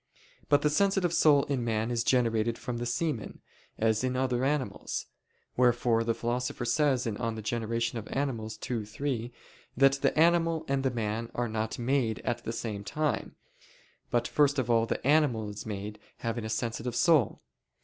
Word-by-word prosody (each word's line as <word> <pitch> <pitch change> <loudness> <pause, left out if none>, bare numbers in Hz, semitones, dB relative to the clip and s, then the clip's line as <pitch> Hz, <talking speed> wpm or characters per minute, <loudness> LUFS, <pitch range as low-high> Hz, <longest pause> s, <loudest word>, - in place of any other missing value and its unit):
But 145 -1 +4
the 150 - +4
sensitive 195 0 +2
soul 145 -4 +5
in 135 -4 -2
man 110 0 -1
is 115 -1 0
generated 115 -2 +2
from 120 -1 -4
the 120 - -2
semen, 125 -2 -2 0.4
as 110 +1 +1
in 130 0 0
other 130 -1 0
animals; 140 -1 -2 0.5
wherefore 120 -2 +3
the 115 0 0
Philosopher 120 +1 -2
says 130 0 +2
(De 115 - -1
Gener. 115 0 -2
Animal. 125 -6 -2 0.2
ii, 115 -3 -1
3) 120 +2 -3 0.5
that 135 +1 +6
the - - +2
animal 165 -1 +3
and 135 0 +1
the 135 - +1
man 115 -1 -3
are 120 0 0
not 110 0 -3
made 120 -2 +1
at 120 0 -2
the - - -2
same 110 -3 -4
time, 150 +7 -2 0.7
but 120 0 +1
first 145 -1 +3
of 125 -3 0
all 115 0 +3
the - - -3
animal 135 -8 +3
is 105 +1 -8
made 105 0 -5 0.2
having 115 -1 -3
a - - -4
sensitive 115 +2 -2
soul. 155 - +3
120 Hz, 165 wpm, -29 LUFS, 115-135 Hz, 0.7 s, that